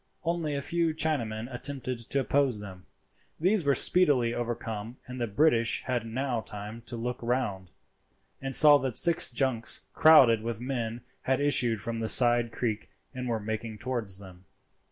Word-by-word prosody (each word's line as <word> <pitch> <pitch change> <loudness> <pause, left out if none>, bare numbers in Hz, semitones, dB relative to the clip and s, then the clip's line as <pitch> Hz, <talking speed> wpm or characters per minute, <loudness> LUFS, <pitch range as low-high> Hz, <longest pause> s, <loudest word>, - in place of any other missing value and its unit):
Only 165 -3 -2
a 140 - -3
few 170 0 -1
Chinamen 120 -9 -2
attempted 130 -1 -3
to 140 - +1
oppose 135 -5 +1
them. 95 -3 -11 0.5
These 185 +3 +2
were 140 -1 +2
speedily 140 -10 +2
overcome, 115 -1 -5
and 125 0 -8
the 120 - -1
British 115 0 +2
had 120 -3 -3
now 125 0 -2
time 105 +2 -9
to 120 - -5
look 120 +2 -4
round, 115 -7 -2 0.7
and 135 -1 +2
saw 145 -2 +9
that 130 -3 -2
six 170 -2 +2
junks 120 -3 -1
crowded 135 -8 +6
with 115 -1 -4
men 120 -2 -4 0.2
had 130 0 0
issued 120 -7 +2
from 115 +2 -4
the 110 -1 -2
side 120 -2 +2
creek 115 -2 -3 0.2
and 125 0 -5
were 115 -2 -1
making 110 +1 -5
towards 115 -5 -3
them. 95 -2 -14
120 Hz, 160 wpm, -28 LUFS, 110-140 Hz, 0.7 s, saw